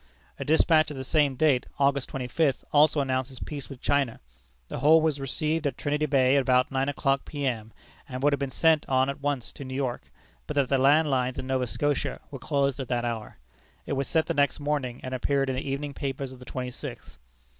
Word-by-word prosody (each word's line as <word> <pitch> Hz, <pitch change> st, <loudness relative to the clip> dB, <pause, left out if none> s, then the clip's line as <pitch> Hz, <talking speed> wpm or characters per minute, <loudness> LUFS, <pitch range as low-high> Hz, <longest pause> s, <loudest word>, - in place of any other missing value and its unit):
A -, -, -2 dB
despatch 155 Hz, 0 st, +4 dB
of 145 Hz, -, -7 dB
the 130 Hz, -, -4 dB
same 145 Hz, 0 st, +2 dB
date, 140 Hz, -3 st, +2 dB
August 140 Hz, -1 st, +1 dB
twenty 130 Hz, -2 st, -4 dB
fifth, 145 Hz, 0 st, 0 dB
also 150 Hz, 0 st, +5 dB
announces 130 Hz, -1 st, -2 dB
peace 145 Hz, -3 st, -6 dB
with 135 Hz, -3 st, -11 dB
China. 140 Hz, -5 st, +1 dB, 0.5 s
The -, -, -5 dB
whole 155 Hz, +5 st, +6 dB
was 155 Hz, -3 st, 0 dB
received 155 Hz, +3 st, -1 dB
at 140 Hz, -, -4 dB
Trinity 150 Hz, +1 st, 0 dB
Bay 135 Hz, -1 st, +4 dB
about 130 Hz, -1 st, +3 dB
nine 135 Hz, +1 st, 0 dB
o'clock 135 Hz, -1 st, 0 dB
P.M., 125 Hz, -7 st, -3 dB, 0.4 s
and 130 Hz, 0 st, -5 dB
would 145 Hz, 0 st, +4 dB
have 140 Hz, -, 0 dB
been 140 Hz, -1 st, -2 dB
sent 160 Hz, +3 st, +2 dB
on 130 Hz, +1 st, +3 dB
at 140 Hz, -, -11 dB
once 140 Hz, -4 st, -2 dB
to -, -, -8 dB
New 130 Hz, -1 st, -6 dB
York, 130 Hz, -3 st, -3 dB, 0.4 s
but 150 Hz, -, -4 dB
that 140 Hz, -3 st, +2 dB
the 135 Hz, -, +2 dB
land 145 Hz, +3 st, +4 dB
lines 130 Hz, -1 st, 0 dB
in -, -, -4 dB
Nova 130 Hz, -1 st, 0 dB
Scotia 145 Hz, +3 st, -1 dB
were 135 Hz, -, -7 dB
closed 140 Hz, 0 st, 0 dB
at 130 Hz, -, -4 dB
that 120 Hz, -1 st, -1 dB
hour. 115 Hz, -3 st, -4 dB, 0.5 s
It -, -, -3 dB
was 135 Hz, 0 st, -1 dB
sent 160 Hz, -2 st, +2 dB
the 165 Hz, -, -1 dB
next 145 Hz, -2 st, +1 dB
morning, 145 Hz, -4 st, -2 dB
and 130 Hz, -, -5 dB
appeared 135 Hz, +1 st, 0 dB
in -, -, -3 dB
the 135 Hz, +2 st, -4 dB
evening 140 Hz, +1 st, -3 dB
papers 135 Hz, -1 st, -4 dB
of 130 Hz, -, -12 dB
the 125 Hz, -, -12 dB
twenty 125 Hz, 0 st, -4 dB
sixth. -, -, -9 dB
135 Hz, 220 wpm, -27 LUFS, 130-145 Hz, 0.5 s, whole